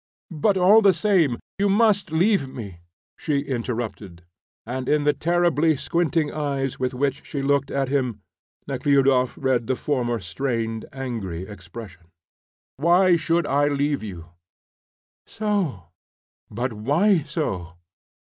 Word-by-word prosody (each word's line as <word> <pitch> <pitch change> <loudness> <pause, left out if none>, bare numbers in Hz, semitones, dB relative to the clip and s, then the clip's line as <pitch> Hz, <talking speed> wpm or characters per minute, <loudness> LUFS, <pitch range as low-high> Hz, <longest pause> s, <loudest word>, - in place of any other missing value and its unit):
"But 195 +6 +2
all 195 +5 +6
the 200 -3 +5
same, 170 - +2 0.2
you 200 0 +2
must 205 -3 +3
leave 170 -2 +2
me," 100 -9 -8 0.4
she 150 -3 0
interrupted, 115 -9 -5 0.4
and 130 +2 -4
in 150 0 +2
the 150 0 +3
terribly 165 -2 +2
squinting 165 -1 0
eyes 135 -3 -2
with 130 0 -1
which 140 +1 -1
she 140 -2 -4
looked 140 0 +1
at 135 -1 -1
him 130 -5 -1 0.4
Nekhludoff 135 -3 +2
read 130 -4 0
the 130 - +1
former 120 -4 -1
strained, 115 +3 -3
angry 115 -10 -5
expression. 95 -2 -11 0.7
"Why 175 +4 +4
should 165 0 +1
I 145 +1 +2
leave 145 0 0
you?" 90 -6 -8 1.0
"So." 190 - -2 0.6
"But 120 +3 -3
why 155 - +2
so?" 95 - -4
140 Hz, 125 wpm, -23 LUFS, 120-165 Hz, 1.0 s, all